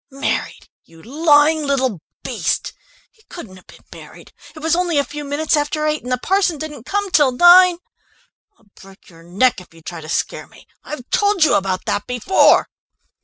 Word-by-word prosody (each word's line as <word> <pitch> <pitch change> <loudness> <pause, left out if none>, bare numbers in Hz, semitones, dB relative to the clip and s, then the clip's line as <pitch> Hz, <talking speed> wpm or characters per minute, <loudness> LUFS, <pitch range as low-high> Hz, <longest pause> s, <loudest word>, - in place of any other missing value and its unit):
"Married, 275 +1 -4 0.2
you 165 0 -20
lying 300 +3 +3
little 265 - -1 0.2
beast! - - -3 0.4
He 440 - -29
couldn't 205 - -11
have 185 - -20
been - - -18
married! - - -15 0.2
It - - -14
was 320 +1 0
only 350 -3 -1
a 285 - +3
few 295 +1 -8
minutes 290 +3 -1
after 300 +1 -2
eight, 305 0 -1
and 250 - -8
the 250 - +1
parson 370 +3 0
didn't 290 -5 -9
come 405 -1 -2
till 290 -6 +3
nine. 350 +5 +6 0.8
I'll - - -30 0.2
break 195 -1 -18
your 165 -1 -17
neck 190 +7 0
if 175 -2 -19
you 165 - -18
try 170 0 -8
to 155 - -11
scare - - -3
me! - - -20 0.2
I've 260 -4 -9
told 405 -4 +2
you 310 - +3
about 190 -1 -1
that 205 - -3
before...." 250 - +3
290 Hz, 185 wpm, -18 LUFS, 220-320 Hz, 0.8 s, nine